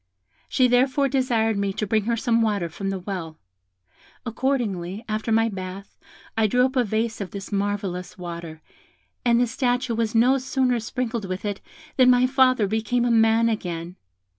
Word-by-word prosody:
She 255 Hz, -, +3 dB
therefore 260 Hz, +3 st, +3 dB
desired 235 Hz, -5 st, +1 dB
me 200 Hz, -1 st, -1 dB
to 215 Hz, -, -2 dB
bring 215 Hz, 0 st, 0 dB
her 235 Hz, 0 st, 0 dB
some 230 Hz, 0 st, +1 dB
water 205 Hz, -6 st, 0 dB
from 195 Hz, +5 st, -4 dB
the 195 Hz, -, -2 dB
well. 180 Hz, -4 st, -6 dB, 0.9 s
Accordingly, 225 Hz, -6 st, -2 dB
after 215 Hz, +1 st, -2 dB
my 225 Hz, +1 st, +3 dB
bath, 190 Hz, -1 st, -7 dB, 0.4 s
I 220 Hz, -1 st, +3 dB
drew 250 Hz, +4 st, +3 dB
up 260 Hz, +1 st, -3 dB
a 250 Hz, -, +3 dB
vase 220 Hz, +1 st, -2 dB
of 195 Hz, -, -4 dB
this 200 Hz, +2 st, -8 dB
marvellous 195 Hz, -3 st, -3 dB
water, 170 Hz, -3 st, -8 dB, 0.6 s
and 235 Hz, -1 st, +3 dB
the 245 Hz, -, +4 dB
statue 245 Hz, 0 st, -1 dB
was 225 Hz, 0 st, -1 dB
no 255 Hz, +4 st, +4 dB
sooner 255 Hz, -2 st, 0 dB
sprinkled 230 Hz, -1 st, -3 dB
with 185 Hz, +2 st, -5 dB
it, 205 Hz, -1 st, -3 dB, 0.4 s
than 255 Hz, -1 st, +6 dB
my 250 Hz, 0 st, +5 dB
father 255 Hz, -3 st, +3 dB
became 220 Hz, +4 st, 0 dB
a 240 Hz, -, +2 dB
man 225 Hz, 0 st, +4 dB
again. 175 Hz, -5 st, -3 dB
225 Hz, 170 wpm, -24 LUFS, 195-245 Hz, 0.9 s, than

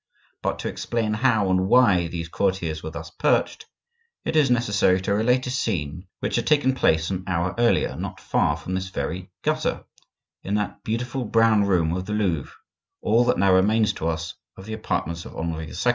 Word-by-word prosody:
But -, -, -1 dB
to -, -, -3 dB
explain 115 Hz, -2 st, -2 dB
how 110 Hz, -4 st, +2 dB
and 95 Hz, 0 st, +2 dB
why 100 Hz, -7 st, +4 dB
these 85 Hz, 0 st, -5 dB
courtiers 85 Hz, -3 st, -1 dB
were 80 Hz, -, -5 dB
thus 80 Hz, -, -8 dB
perched, -, -, 0 dB, 0.6 s
it -, -, -2 dB
is 150 Hz, -4 st, +4 dB
necessary 105 Hz, -6 st, +3 dB
to 100 Hz, -, 0 dB
relate 125 Hz, +5 st, +2 dB
a 125 Hz, -, -3 dB
scene 90 Hz, -, -2 dB
which -, -, -1 dB
had 120 Hz, -, -1 dB
taken 145 Hz, -4 st, +3 dB
place 80 Hz, -9 st, +2 dB
an 95 Hz, -1 st, -3 dB
hour 90 Hz, 0 st, 0 dB
earlier 120 Hz, -1 st, +2 dB
not -, -, -6 dB
far 75 Hz, +1 st, +1 dB
from 80 Hz, +3 st, -6 dB
this 95 Hz, 0 st, -2 dB
very 90 Hz, 0 st, -4 dB
gutter, -, -, -1 dB, 0.6 s
in 100 Hz, -, -2 dB
that 105 Hz, -3 st, -3 dB
beautiful 120 Hz, +4 st, -2 dB
brown 115 Hz, -2 st, +3 dB
room 85 Hz, -4 st, +2 dB
of 90 Hz, 0 st, -4 dB
the 105 Hz, -, -3 dB
Louvre, 90 Hz, -9 st, -1 dB, 0.5 s
all 115 Hz, +3 st, +4 dB
that 125 Hz, -, +2 dB
now 95 Hz, 0 st, +4 dB
remains 105 Hz, +3 st, +3 dB
to 80 Hz, -, -3 dB
us 80 Hz, -1 st, -3 dB, 0.2 s
of 95 Hz, -, -10 dB
the 110 Hz, -, -6 dB
apartments 85 Hz, -6 st, -3 dB
of -, -, -10 dB
Henri 80 Hz, -1 st, -3 dB
II. -, -, -9 dB
95 Hz, 190 wpm, -24 LUFS, 85-115 Hz, 0.6 s, why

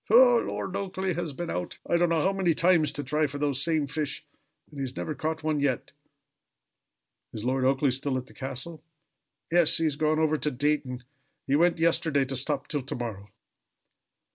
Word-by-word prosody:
"Ho! 245 Hz, +1 st, +7 dB
Lord 195 Hz, -, -4 dB
Oakleigh 190 Hz, -1 st, -2 dB
has 170 Hz, -2 st, -3 dB
been 170 Hz, +5 st, -5 dB
out 90 Hz, -, -4 dB
I -, -, +1 dB
don't 175 Hz, 0 st, +3 dB
know 165 Hz, -2 st, +2 dB
how 195 Hz, -, +2 dB
many 185 Hz, -4 st, +1 dB
times 170 Hz, -3 st, +4 dB
to 145 Hz, -, -4 dB
try 150 Hz, +3 st, +1 dB
for 145 Hz, +1 st, -6 dB
those 140 Hz, -2 st, 0 dB
same 155 Hz, -1 st, +2 dB
fish, 145 Hz, 0 st, -3 dB, 0.5 s
and 145 Hz, -, -9 dB
he -, -, -2 dB
has 130 Hz, -1 st, -5 dB
never 155 Hz, -, -3 dB
caught 155 Hz, +2 st, -3 dB
one 155 Hz, -1 st, 0 dB
yet." 140 Hz, -4 st, -1 dB, 1.4 s
"Is 110 Hz, +1 st, -5 dB
Lord 130 Hz, +1 st, +1 dB
Oakleigh 135 Hz, +1 st, +3 dB
still 135 Hz, +1 st, -1 dB
at 125 Hz, -, -4 dB
the -, -, -17 dB
castle?" 135 Hz, +4 st, -5 dB, 0.7 s
"Yes. 170 Hz, -2 st, +4 dB
He 165 Hz, -, 0 dB
has 155 Hz, -3 st, +1 dB
gone 155 Hz, 0 st, +2 dB
over 155 Hz, -1 st, +2 dB
to 150 Hz, -, +1 dB
Dayton 130 Hz, -2 st, -1 dB, 0.4 s
he 135 Hz, -, +1 dB
went 170 Hz, +3 st, +3 dB
yesterday 160 Hz, -4 st, +2 dB
to 135 Hz, +1 st, -4 dB
stop 140 Hz, +1 st, -2 dB
till 145 Hz, -2 st, -1 dB
to 130 Hz, -, -4 dB
morrow." 105 Hz, -4 st, -6 dB
150 Hz, 195 wpm, -27 LUFS, 135-165 Hz, 1.4 s, Ho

